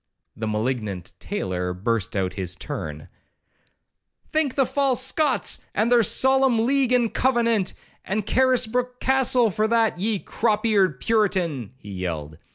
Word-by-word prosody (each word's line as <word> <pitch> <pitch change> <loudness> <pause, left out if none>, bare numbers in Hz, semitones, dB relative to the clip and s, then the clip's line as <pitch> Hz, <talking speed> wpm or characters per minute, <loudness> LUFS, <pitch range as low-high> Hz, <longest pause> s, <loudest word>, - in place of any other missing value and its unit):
The 110 - -4
malignant 110 -4 -3
tailor 90 -1 -3
burst 105 +1 -2
out 95 -2 0
in - - -16
his 90 -2 -3
turn: 75 -3 -6 1.2
'Thank 310 -4 +1
the 270 - +3
false 265 -1 0
Scots, 290 0 0
and 220 +4 +1
their 240 -1 +6
solemn 265 +1 +3
league 270 -1 +2
and 240 -3 +2
covenant, 235 -6 +1 0.3
and 205 +1 -2
Carisbrook 250 -1 +1
Castle, 255 -3 +3
for 215 +4 0
that, 225 -4 +2
ye 215 +2 0
crop 215 +2 -1
eared 190 - +2
Puritan,' 175 - 0
he 105 -5 -11
yelled. 80 -5 -5
215 Hz, 140 wpm, -23 LUFS, -, 1.2 s, their